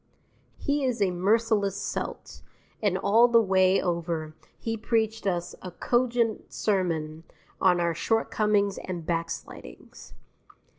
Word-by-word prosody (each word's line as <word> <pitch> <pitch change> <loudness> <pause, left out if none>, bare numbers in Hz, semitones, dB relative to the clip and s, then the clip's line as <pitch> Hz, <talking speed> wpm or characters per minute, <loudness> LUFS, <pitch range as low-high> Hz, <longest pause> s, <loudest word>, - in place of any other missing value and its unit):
He 285 -1 -1
is 250 -3 0
a 195 -2 +2
merciless 200 +2 +1
Celt, - - -5 0.4
and 200 -4 +1
all 220 +5 +5
the 235 -1 +5
way 190 -2 +3
over 170 -3 -2 0.2
he 225 0 -3
preached 220 -1 -1
us 175 -1 -1
a 185 - -6
cogent 240 +3 0
sermon 165 -6 -1 0.4
on 180 -2 +4
our 170 -1 +1
shortcomings 210 0 +1
and 175 -3 -6
backslidings. 165 0 -6
195 Hz, 115 wpm, -27 LUFS, 175-225 Hz, 0.4 s, all